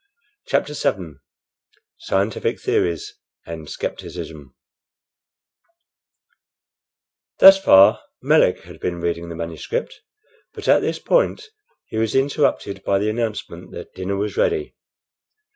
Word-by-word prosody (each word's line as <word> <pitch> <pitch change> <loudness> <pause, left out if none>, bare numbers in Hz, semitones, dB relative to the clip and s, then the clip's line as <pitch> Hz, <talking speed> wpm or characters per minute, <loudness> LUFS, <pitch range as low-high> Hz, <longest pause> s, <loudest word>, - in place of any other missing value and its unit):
CHAPTER 150 - 0
VII 90 - -2 0.8
SCIENTIFIC 100 +3 -1
THEORIES 85 -3 -1 0.3
AND 80 -2 -8
SCEPTICISM 70 -5 -7 2.8
Thus 195 0 +9
far 95 +1 +6 0.2
Melick - - +3
had - - -13
been 85 -1 -3
reading 85 0 -3
the 85 - -7
manuscript, 85 - -5 0.5
but - - -8
at - - +6
this - - -2
point 480 -3 0 0.4
he - - -7
was 110 -1 -1
interrupted 135 -8 0
by 100 - +1
the 105 +2 0
announcement 110 -1 -4
that - - -9
dinner 95 +1 -3
was 105 +1 -3
ready. 410 -3 0
100 Hz, 110 wpm, -21 LUFS, 85-135 Hz, 2.8 s, Thus